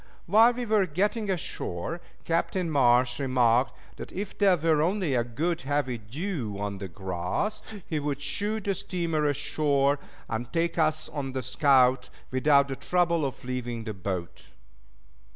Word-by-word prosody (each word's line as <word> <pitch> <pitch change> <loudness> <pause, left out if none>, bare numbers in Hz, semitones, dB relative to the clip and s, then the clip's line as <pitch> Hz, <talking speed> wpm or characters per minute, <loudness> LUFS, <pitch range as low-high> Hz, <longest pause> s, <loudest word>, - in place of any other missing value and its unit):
While 225 +6 +6
we 245 0 -4
were 210 -4 +2
getting 205 +6 0
ashore, 165 - -3 0.2
Captain 170 +1 0
Marsh 125 -2 +3
remarked 125 -2 +2 0.2
that - - -8
if 200 +1 -5
there 195 -3 +4
were 160 -1 +2
only 180 -2 +1
a 120 -2 +2
good 155 +9 -2
heavy 135 -3 -1
dew 120 - -4
on 100 -1 -4
the 95 - -5
grass 95 - -3 0.3
he 155 - -1
would 145 -1 -2
shoot 205 +10 -1
the 200 - 0
steamer 170 -5 -2
ashore, 145 0 +1 0.3
and 115 +1 -4
take 170 0 0
us 155 -1 +1
on 135 -3 -5
the 130 -1 -2
scout 130 -1 +3 0.2
without 140 +2 +4
the 135 - -4
trouble 170 0 +1
of 135 -2 -4
leaving 120 -2 -3
the 110 -1 -4
boat. 90 -2 -5
145 Hz, 150 wpm, -27 LUFS, 125-175 Hz, 0.3 s, While